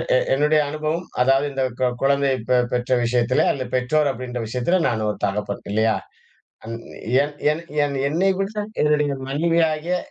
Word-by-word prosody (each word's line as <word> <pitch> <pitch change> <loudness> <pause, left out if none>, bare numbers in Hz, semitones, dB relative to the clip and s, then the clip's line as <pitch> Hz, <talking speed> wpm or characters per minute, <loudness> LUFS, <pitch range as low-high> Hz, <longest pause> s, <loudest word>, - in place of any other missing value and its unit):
எ - - +6 0.2
என்னுடைய 150 +3 +3
அனுபவம் 155 +3 -2 0.2
அதாவது 135 +2 +3
இந்த 135 -1 -1 0.2
கொ 130 - +3
கொழந்தையை 140 -1 +2
பெ 125 - +4
பெற்ற 125 +1 -2
விஷயத்துல 120 +1 +2
அல்ல. 135 - -3
பெற்றோர் 145 +4 +2
அப்படின்ற 125 -1 -6
விஷயத்துல 125 +10 0
நான் 110 -2 -1
ஒரு 105 - -2
தகப்பன் 100 0 -2
இல்லையா? 110 +1 +2 0.7
அ - - -10 0.6
என் 145 +1 -4 0.2
என் 155 +2 -1 0.2
என் 140 -1 -2
என்னைய 185 +6 +2
விட 195 +1 -2 0.3
என்னுடைய 150 -1 +2
மனைவியாகிய 165 +3 +1
140 Hz, 155 wpm, -22 LUFS, 125-155 Hz, 0.7 s, எ